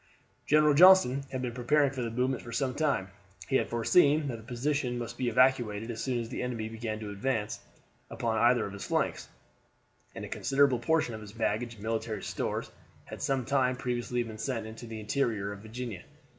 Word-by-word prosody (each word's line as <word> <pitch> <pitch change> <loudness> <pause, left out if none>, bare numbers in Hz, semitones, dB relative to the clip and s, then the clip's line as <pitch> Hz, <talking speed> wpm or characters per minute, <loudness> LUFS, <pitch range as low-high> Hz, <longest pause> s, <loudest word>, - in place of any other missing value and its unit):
General 150 0 +5
Johnston 145 -5 +7
had 130 -1 -3
been 125 - -2
preparing 135 +4 +2
for 135 -3 -4
the 120 - -2
movement 125 +2 -1
for 120 - -9
some 130 +2 -1
time; 140 -11 0 0.4
he 135 - +3
had - - -1
foreseen 145 +5 +3
that 120 - -4
the - - -11
position 125 +2 -2
must 120 -1 -5
be 125 0 -1
evacuated 120 -3 +2
as 115 0 -5
soon 125 0 -1
as 115 -1 -5
the 125 - -4
enemy 120 -3 -3
began 110 -1 -4
to 105 -1 -5
advance 110 0 -2 0.5
upon 110 -2 -1
either 120 0 +4
of 100 - -7
his 100 - -7
flanks, - - -1 0.9
and - - -5
a - - -7
considerable 135 -1 +2
portion 155 0 +1
of 110 - -7
his 105 -1 -11
baggage 115 +1 -1
and 105 - -13
military 110 -1 -2
stores - - -3 0.3
had - - -9
some 135 -3 0
time 130 -1 +2
previously 125 -1 -2
been 110 -2 -9
sent 115 -2 -2
into 110 +2 -9
the 110 -1 -6
interior 105 -3 -1
of 100 - -8
Virginia. 110 -2 -6
120 Hz, 200 wpm, -30 LUFS, 110-135 Hz, 0.9 s, Johnston